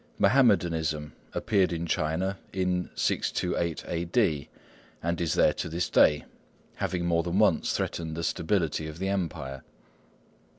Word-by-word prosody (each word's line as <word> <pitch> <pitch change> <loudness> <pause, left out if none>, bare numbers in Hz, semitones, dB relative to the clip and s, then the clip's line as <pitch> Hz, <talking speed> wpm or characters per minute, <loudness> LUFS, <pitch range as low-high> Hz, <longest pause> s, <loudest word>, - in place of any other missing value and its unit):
Mahommedanism 85 - +2 0.2
appeared 100 -4 +2
in 85 0 -2
China 85 +5 -1
in 90 -1 -1
628 85 -2 -1
A.D., 85 - 0 0.5
and 85 +1 -1
is 85 - 0
there - - +4
to - - -4
this 85 +2 -2
day, 75 - +4 0.5
having 90 -2 -1
more 85 -1 +2
than 85 +2 -2
once 105 -6 +3
threatened 80 -1 -3
the 85 - -3
stability 80 -3 0
of 80 0 -8
the 95 +2 -2
Empire. 80 -8 -3
85 Hz, 130 wpm, -28 LUFS, 80-95 Hz, 0.5 s, there